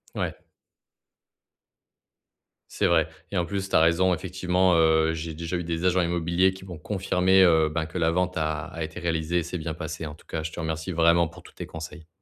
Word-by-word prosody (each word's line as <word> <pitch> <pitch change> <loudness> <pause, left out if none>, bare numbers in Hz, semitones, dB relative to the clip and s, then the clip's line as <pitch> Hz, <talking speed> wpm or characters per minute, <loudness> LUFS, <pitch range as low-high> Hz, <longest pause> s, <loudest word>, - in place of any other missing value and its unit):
Ouais. - - -2 2.3
C'est - - -1
vrai 80 -2 +3 0.2
et 100 - -2
en 85 - +1
plus, 95 +1 -4
tu - - -1
as - - +6
raison 85 +3 +3
effectivement, 90 +1 +1
heu, 80 -1 +3
j'ai 80 0 -5
déjà 85 +3 -4
eu 90 - -2
des 85 +1 -3
agents 90 0 +3
immobiliers 85 +2 +2
qui 95 0 -12
m'ont 90 -3 -8
confirmé, 95 0 +2
heu 80 -3 +4
ben 80 +1 -2
que 85 +3 -7
la 80 -1 +2
vente 90 +1 0
a 75 -2 -2
été 80 0 -7
réalisée, 85 +1 0
s'est 85 +2 -5
bien 80 -1 -4
passée. 80 -1 -6
En 75 -1 -7
tout - - -21
cas, 80 - -4
je 80 - -4
te 85 - -8
remercie 80 +2 -3
vraiment 85 0 +4
pour 85 +1 -15
tous - - -16
tes - - -7
conseils. 80 0 -9
85 Hz, 205 wpm, -26 LUFS, 80-90 Hz, 2.3 s, as